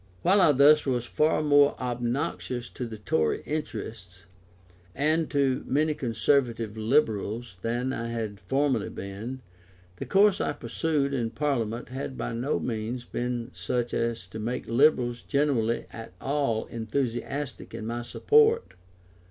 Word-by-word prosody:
While 195 +2 +5
I 155 - +6
thus 145 +2 +6
was 125 -2 0
far 155 +4 +1
more 145 -1 +4
obnoxious 120 0 -2
to 125 - -5
the 110 -1 -7
Tory 80 -7 0
interest, 100 - -5 0.7
and 155 +3 +1
to 135 -3 +1
many 155 +3 +2
Conservative 115 -3 0
Liberals 110 -3 0
than 120 +4 -1
I 115 -2 -3
had 110 -3 -4
formerly 135 +3 0
been, 110 +7 -7 0.5
the - - -6
course 200 0 +4
I - - 0
pursued 140 +4 -1
in 120 -4 0
Parliament 120 -2 -2
had 130 0 -5
by - - -3
no 125 +6 -1
means 120 +1 -3
been 120 0 -3
such 120 -1 -2
as 115 -5 -1
to 110 - -7
make 120 +4 -3
Liberals 120 -1 +3
generally 135 -6 +1
at 115 -5 -9
all 135 -6 0
enthusiastic 125 +3 -3
in 110 - -5
my 120 +1 -3
support. 445 - +3
120 Hz, 135 wpm, -27 LUFS, 115-140 Hz, 0.7 s, I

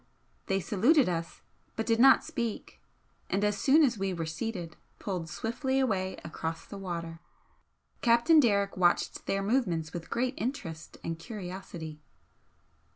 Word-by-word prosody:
They 195 0 +1
saluted 240 - +3
us, 165 -2 -3 0.3
but 225 - -2
did 225 -1 +2
not 270 +2 +7
speak, 235 -3 -4 0.5
and 195 +2 0
as 210 0 +2
soon 290 +8 +5
as 245 -7 +2
we 190 -1 -1
were 165 -1 -3
seated, 170 +1 -4 0.2
pulled 180 -5 -4
swiftly 260 - -1
away 190 -7 0
across 160 +1 -4
the 200 - -9
water. 170 -3 -5 0.8
Captain 235 +7 +5
Derrick 200 -6 +2
watched 175 -1 +1
their 195 0 0
movements 185 -9 0
with 170 -2 -6
great 250 +2 0
interest 180 - -5
and 165 0 -4
curiosity. 175 -6 -7
195 Hz, 140 wpm, -30 LUFS, 170-235 Hz, 0.8 s, not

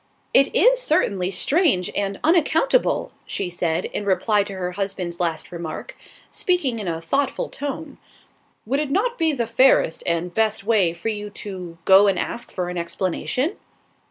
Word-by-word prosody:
"It 275 +10 +4
is - - +5
certainly 200 - +1
strange 225 - +2
and 200 -1 -2
unaccountable," 340 +9 +2
she 185 -3 -3
said, 175 0 -1
in - - -4
reply 205 +2 +2
to 200 - -7
her 180 -1 -3
husband's 185 -2 -4
last 165 -3 -2
remark, 170 -2 -6 0.4
speaking 290 -11 0
in 205 - -5
a 165 -1 -2
thoughtful 270 +12 -1
tone. 290 +1 -6 0.7
"Would 265 +6 0
it 300 -2 -2
not 420 - 0
be 325 -1 +3
the 245 -5 -1
fairest 230 -7 +3
and 170 +1 -1
best 220 -1 +1
way 205 -5 +3
for 170 +6 -4
you 210 -1 -4 0.2
to 180 -4 -7
go 195 +2 +7
and 195 -2 +2
ask 235 - -3
for 180 -1 -3
an 180 -1 -3
explanation?" 190 - -2
200 Hz, 160 wpm, -22 LUFS, 180-280 Hz, 0.7 s, go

